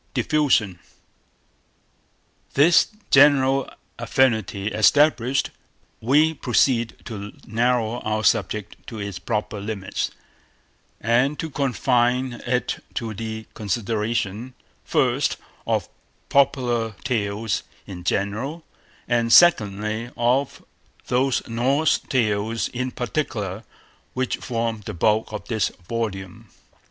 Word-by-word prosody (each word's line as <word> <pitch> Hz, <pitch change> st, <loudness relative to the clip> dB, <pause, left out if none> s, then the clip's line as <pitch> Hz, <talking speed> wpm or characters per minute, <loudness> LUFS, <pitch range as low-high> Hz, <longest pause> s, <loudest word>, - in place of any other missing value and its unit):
DIFFUSION 130 Hz, -, +2 dB, 1.8 s
This 150 Hz, +4 st, +6 dB, 0.2 s
general 135 Hz, -1 st, +5 dB, 0.3 s
affinity 110 Hz, -6 st, +1 dB
established, 130 Hz, +3 st, +3 dB, 0.5 s
we 150 Hz, +7 st, +3 dB
proceed 120 Hz, -4 st, +1 dB
to 105 Hz, -3 st, -7 dB
narrow 120 Hz, +1 st, 0 dB
our 110 Hz, 0 st, -2 dB
subject 105 Hz, -1 st, 0 dB
to 115 Hz, -, -7 dB
its 100 Hz, -3 st, -5 dB
proper 105 Hz, -2 st, -3 dB
limits, 100 Hz, -2 st, -3 dB, 0.9 s
and 125 Hz, +6 st, +2 dB
to 160 Hz, -, -5 dB
confine 125 Hz, -2 st, +1 dB
it 125 Hz, 0 st, -1 dB
to 115 Hz, -2 st, -3 dB
the 110 Hz, +1 st, -5 dB
consideration, 110 Hz, +2 st, -2 dB, 0.3 s
first, -, -, +1 dB, 0.3 s
of -, -, 0 dB, 0.4 s
Popular 120 Hz, -5 st, +2 dB
Tales 110 Hz, -3 st, -1 dB, 0.2 s
in 90 Hz, -3 st, -9 dB
general, 110 Hz, -, -2 dB, 0.4 s
and 115 Hz, -1 st, +1 dB
secondly, 110 Hz, -, +4 dB
of 125 Hz, +3 st, 0 dB, 0.4 s
those 130 Hz, +1 st, +1 dB
Norse 135 Hz, +7 st, +2 dB
Tales 110 Hz, -2 st, -1 dB
in 125 Hz, +1 st, -3 dB
particular, 115 Hz, -6 st, -3 dB, 0.5 s
which 130 Hz, 0 st, -1 dB
form 115 Hz, -2 st, -3 dB
the -, -, -6 dB
bulk 110 Hz, +6 st, +1 dB
of 105 Hz, -, -6 dB
this 110 Hz, -5 st, 0 dB, 0.2 s
volume. 100 Hz, -5 st, -4 dB
115 Hz, 95 wpm, -23 LUFS, 105-130 Hz, 1.8 s, This